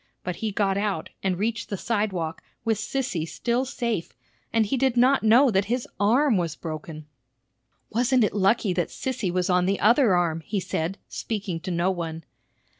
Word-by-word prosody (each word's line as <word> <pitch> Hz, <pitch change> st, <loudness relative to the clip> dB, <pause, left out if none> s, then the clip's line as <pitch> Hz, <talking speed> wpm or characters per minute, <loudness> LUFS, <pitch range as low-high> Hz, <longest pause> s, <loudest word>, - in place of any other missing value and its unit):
But 180 Hz, -1 st, -4 dB
he 220 Hz, -1 st, -2 dB
got 195 Hz, -1 st, +1 dB
out, 200 Hz, -6 st, -2 dB
and 190 Hz, -2 st, 0 dB
reached 220 Hz, +3 st, -2 dB
the 200 Hz, -, -3 dB
sidewalk, 190 Hz, -7 st, -2 dB, 0.2 s
with 225 Hz, -2 st, +1 dB
Sissy 215 Hz, -7 st, -2 dB
still 240 Hz, +8 st, -1 dB
safe, 235 Hz, -9 st, -3 dB, 0.4 s
and 225 Hz, -1 st, +3 dB
he 240 Hz, -, -1 dB
did 260 Hz, -1 st, +1 dB
not 260 Hz, +3 st, +5 dB
know 240 Hz, +4 st, +5 dB
that 195 Hz, -1 st, +2 dB
his 240 Hz, +3 st, -2 dB
arm 235 Hz, +4 st, +4 dB
was 170 Hz, -3 st, -1 dB
broken. 155 Hz, -1 st, -7 dB, 0.9 s
"Wasn't 245 Hz, +2 st, +3 dB
it 210 Hz, -, +1 dB
lucky 200 Hz, 0 st, +2 dB
that 175 Hz, -1 st, 0 dB
Sissy 250 Hz, -8 st, -3 dB
was 180 Hz, 0 st, 0 dB
on 180 Hz, -1 st, +2 dB
the 195 Hz, +1 st, +1 dB
other 230 Hz, -2 st, +5 dB
arm?" 165 Hz, -2 st, +1 dB
he 205 Hz, -, -2 dB
said, 175 Hz, +1 st, -2 dB
speaking 200 Hz, -6 st, -4 dB
to 185 Hz, -, -6 dB
no 175 Hz, +1 st, +1 dB
one. 165 Hz, -3 st, -4 dB
200 Hz, 180 wpm, -25 LUFS, 180-235 Hz, 0.9 s, not